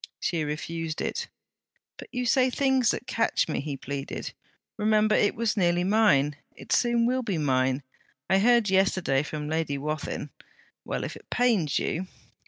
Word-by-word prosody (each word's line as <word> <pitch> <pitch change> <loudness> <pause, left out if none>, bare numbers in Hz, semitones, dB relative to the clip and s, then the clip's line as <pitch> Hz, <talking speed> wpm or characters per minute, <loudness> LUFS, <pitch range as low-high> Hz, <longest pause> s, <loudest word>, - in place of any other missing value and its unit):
She 170 -4 -1
refused 155 +2 -4
it. - - -3 0.7
'But - - -10
you 250 0 -2
say 255 +1 +3
things 265 -3 +2
that - - -1
catch 230 - +1
me!' 155 - -2
he 140 -1 -5
pleaded. 140 +1 -5 0.4
'Remember, 215 0 +2
it 205 - +3
was 230 -2 0
nearly 175 -3 +2
mine. 180 -9 +3 0.2
It - - -11
soon 240 -1 +3
will 255 +2 +1
be 205 -8 -2
mine. 130 -2 +1 0.4
I 190 +1 +3
heard 235 +1 +4
yesterday 185 -7 +2
from 150 0 -5
Lady 155 -2 -1
Wathin... 150 +2 -4 0.5
well, - - -3
if - - -5
it - - -15
pains 215 - +2
you!' 185 +3 -2
185 Hz, 160 wpm, -27 LUFS, 150-230 Hz, 0.7 s, heard